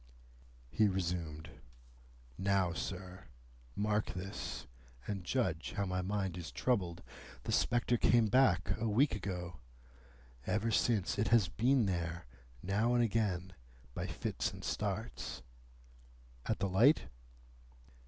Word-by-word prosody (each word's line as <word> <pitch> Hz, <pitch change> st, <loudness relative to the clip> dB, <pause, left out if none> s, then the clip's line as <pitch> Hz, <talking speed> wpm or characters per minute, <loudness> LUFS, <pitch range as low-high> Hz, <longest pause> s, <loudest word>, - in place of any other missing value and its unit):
He 110 Hz, -, +4 dB
resumed. 85 Hz, -5 st, -2 dB, 0.8 s
"Now, 95 Hz, -2 st, +1 dB
sir, 90 Hz, +1 st, -6 dB, 0.5 s
mark 105 Hz, -2 st, 0 dB
this, 95 Hz, +2 st, -5 dB, 0.4 s
and 100 Hz, -3 st, -3 dB
judge 90 Hz, -6 st, -1 dB
how 100 Hz, -, -1 dB
my 90 Hz, -1 st, -1 dB
mind 95 Hz, -2 st, -2 dB
is 85 Hz, -, -6 dB
troubled. 90 Hz, -9 st, 0 dB, 0.4 s
The -, -, -3 dB
spectre 120 Hz, 0 st, +2 dB
came 120 Hz, 0 st, +4 dB
back 110 Hz, -4 st, +3 dB
a 115 Hz, 0 st, 0 dB
week 130 Hz, +8 st, +3 dB
ago. 90 Hz, -6 st, -4 dB, 0.9 s
Ever 110 Hz, +2 st, +1 dB
since, 105 Hz, -3 st, +1 dB
it 105 Hz, -, +2 dB
has 115 Hz, -7 st, +4 dB
been 120 Hz, +6 st, +3 dB
there, 85 Hz, -2 st, -2 dB, 0.4 s
now 110 Hz, +6 st, +2 dB
and 120 Hz, -, +4 dB
again, 100 Hz, -5 st, 0 dB, 0.4 s
by -, -, -3 dB
fits -, -, -2 dB
and -, -, -10 dB
starts." 105 Hz, +2 st, -3 dB, 1.0 s
"At 110 Hz, -, +1 dB
the 100 Hz, 0 st, 0 dB
light?" 115 Hz, -, +5 dB
100 Hz, 120 wpm, -34 LUFS, 90-110 Hz, 1.0 s, light